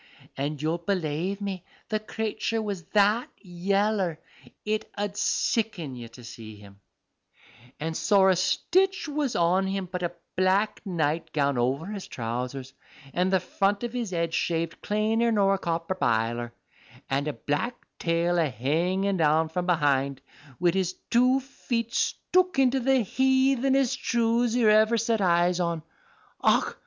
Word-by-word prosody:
If 145 +2 -3
you'll 165 +2 0
belave 180 +1 -2
me, 195 -3 -4 0.3
the 215 -1 0
crayture 220 +1 -2
was 205 -4 -3
that 210 +5 +2
yeller 195 -1 0 0.5
it 215 0 -2
'ud 205 0 -2
sicken 205 - 0
you 120 -1 -8
to 120 +2 -14
see 110 -1 -10
him; 100 -1 -15 1.0
and 160 +1 -3
sorra 190 -1 +4
stich 370 - +1
was 290 -3 -1
on 180 +3 +2
him 195 0 -2
but 180 -1 -3
a 175 - -1 0.2
black 190 +3 +1
night 165 -3 -1
gown 140 -4 +1
over 130 +6 0
his 200 -1 -6
trousers, 125 +3 -5 0.4
and 180 +2 +1
the 190 - +4
front 200 +4 0
of 240 0 -4
'is 235 -4 -2
head 170 -2 -2
shaved 165 -1 -1
claner 220 +3 +1
nor 200 -2 +3
a 195 - -1
copper 165 +1 -2
biler, 120 -5 0 0.6
and 140 +2 -1
a 150 - -1
black 145 - -2 0.2
tail 170 +1 +1
a 160 -3 +2
hanging 175 - 0
down 160 0 +3
from 180 +2 -3
behind, 140 -5 +1 0.4
wid 175 -1 +3
his 185 -1 0 0.2
two 250 +3 +4
feet 235 -3 -4
stook 365 -3 +1
into 265 0 +3
the 265 0 +3
heathenesest 265 +2 +2
shoes 235 0 +1
you 240 -3 +3
ever 215 +2 +5
set 225 -1 0
eyes 175 0 +3
on. 170 -2 -1 0.6
Och! - - +2
185 Hz, 145 wpm, -26 LUFS, 160-220 Hz, 1.0 s, ever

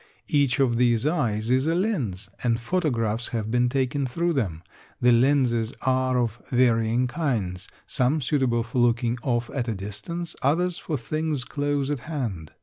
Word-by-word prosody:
Each 140 -3 +2
of 125 -4 +3
these 120 0 +3
eyes 120 -8 0
is 130 +3 +3
a 165 - +2
lens 135 - -1 0.2
and 115 -2 +2
photographs 120 -7 -1
have 110 -2 -3
been 125 0 +3
taken 135 +1 0
through 170 +7 0
them. 90 - -2 0.4
The 125 0 +5
lenses 120 -2 +3
are 130 -1 +2
of 120 -1 -1
varying 120 -1 +3
kinds 120 - -2 0.2
some 130 +5 +1
suitable 130 -4 +1
for 120 +2 -3
looking 120 0 +2
off 120 -2 -1
at 125 -4 -2
a 115 - -1
distance, 105 - -6
others 175 +6 +1
for 155 -6 -3
things 155 +2 -2
close 145 0 -1
at 145 - -1
hand. 120 - -5
125 Hz, 160 wpm, -25 LUFS, 115-145 Hz, 0.4 s, The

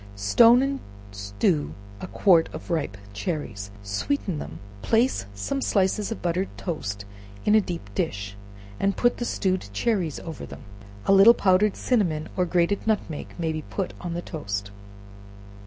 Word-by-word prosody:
Stone 230 - +6
and 275 0 -1 0.3
stew 100 - -1 0.2
a - - -6
quart 180 -4 +4
of - - -7
ripe 145 - -1 0.2
cherries, 105 - -4
sweeten 155 - -2
them, 80 - -7 0.2
place 230 - +2
some 270 - -2
slices 200 -1 +1
of 225 - -5
buttered 180 +2 0
toast 100 - -4 0.4
in 210 - +4
a 215 - +7
deep 175 - -5
dish, 100 0 -2 0.4
and 200 0 +1
put 240 0 +3
the 240 - -2
stewed 185 - 0
cherries 175 - 0
over 165 -4 -7
them. - - -9 0.4
A - - +5
little 200 +5 +8
powdered 190 +2 +3
cinnamon 170 -11 0
or 180 -1 +1
grated 180 +5 +1
nutmeg 205 -8 -2
may 165 -2 -1
be 155 0 -3
put 190 +5 -4
on 175 -2 -4
the 175 - -3
toast. 100 - -4
175 Hz, 155 wpm, -25 LUFS, -, 0.4 s, little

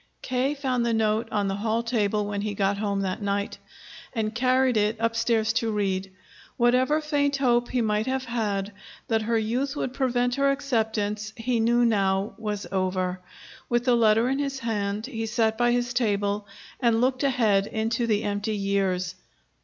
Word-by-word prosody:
K. 260 +3 0
found 260 -4 -1
the 235 -1 +1
note 220 +1 +1
on 205 -2 0
the 195 - -1
hall 225 +2 0
table 210 -3 0
when 205 0 -3
he 210 0 -3
got 200 0 0
home 200 -2 -1
that 190 +2 -2
night, 200 0 -2 0.6
and 215 -1 -1
carried 255 +1 +2
it 210 +1 +2
upstairs 230 -1 +1
to 225 0 0
read. 195 -2 -1 0.5
Whatever 255 +5 +3
faint 285 -2 +1
hope 240 -3 +2
he 250 - 0
might 215 +1 0
have 260 0 -1
had 210 -4 -2 0.4
that 225 -1 +2
her 230 +1 0
youth 250 +6 -1
would 260 -3 -3
prevent 245 -2 +1
her 275 +1 +2
acceptance 220 -6 -1
he 235 +1 0
knew 240 +2 +3
now 195 -3 +1
was 210 -2 -3
over. 185 -1 -1 0.5
With 240 0 +1
the 250 - +4
letter 225 0 +4
in 270 +2 0
his 275 -1 -2
hand, 210 -3 -2
he 225 -4 -4
sat 220 -1 +1
by 240 +1 +2
his 245 0 0
table 205 -3 0 0.3
and 235 -3 +3
looked 255 +1 +1
ahead 220 -8 +2
into 225 +2 -1
the 215 -1 +1
empty 205 +1 -2
years. 195 -2 0
225 Hz, 175 wpm, -26 LUFS, 205-245 Hz, 0.6 s, the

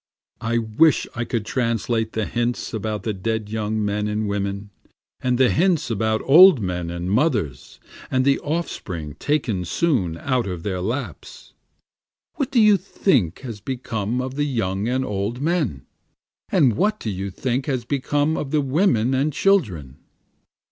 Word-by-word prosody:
I 115 +1 0
wish 115 +8 +3
I 120 0 -3
could 115 -2 -2
translate 115 -2 -1
the 110 -1 -1
hints 120 +1 -2
about 105 -2 -3
the 110 - -1
dead 110 +2 -3
young 110 0 -1
men 105 +1 -1
and 105 0 -1
women, 100 0 -3 0.5
And 125 -1 0
the 130 -1 +4
hints 165 -6 +1
about 110 0 0
old 170 +1 +8
men 90 -4 -3
and 85 +2 -4
mothers, 105 - -1 0.3
and 130 0 +1
the 140 0 +3
offspring 95 - -4
taken 125 -11 0
soon 95 - 0
out 125 +1 -1
of 90 -3 -5
their 95 -3 -2
laps. 120 +9 -5 0.8
What 275 -3 -2
do 265 -3 +2
you 210 -2 +6
think 140 - 0
has 115 -6 -7
become 120 -2 -3
of 130 0 -5
the 145 +1 0
young 100 -5 -1
and 130 +2 0
old 105 +3 -3
men? 145 - -1 0.6
And 135 - +3
what 215 +1 +1
do 110 - -3
you 95 +1 -4
think 125 +6 -2
has 130 -5 -1
become 145 +3 0
of 145 - -3
the 150 +1 +2
women 135 - +2
and 140 +4 +1
children? 105 - +1
115 Hz, 160 wpm, -22 LUFS, 100-140 Hz, 0.8 s, old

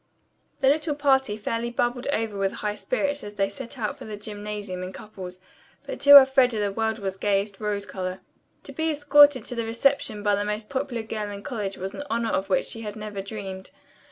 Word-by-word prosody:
The 265 - +3
little 300 +2 +2
party 265 -6 +2
fairly 230 +2 -2
bubbled 240 +1 -1
over 225 -6 -1
with 195 0 0
high 210 0 -2
spirits 290 - -2
as 205 0 -8
they 195 -1 +1
set 245 +5 -8
out 215 -3 -3
for - - -8
the 215 -1 -6
gymnasium 205 -2 -6
in 185 0 -5
couples, 185 -3 -9 0.5
but - - -6
to 285 0 +11
Elfreda 265 -3 +5
the 205 -1 0
world 220 +1 -1
was 195 -3 -4
gayest 200 0 0
rose 205 -1 -2
color. 185 -1 -5 0.4
To - - -9
be 320 -1 -1
escorted 290 -2 +5
to - - -4
the 235 -1 -2
reception 230 -2 +1
by 205 -1 +3
the 205 0 +1
most 210 +1 -3
popular 260 -4 -2
girl 215 -1 -4
in 200 0 -7
college 210 -8 -4
was 190 +1 -5
an - - -6
honor 230 0 0
of 190 - -1
which 190 - +2
she 225 - -4
had 210 -2 -6
never 210 -2 -5
dreamed. 195 -2 -7
215 Hz, 210 wpm, -25 LUFS, 200-260 Hz, 0.5 s, to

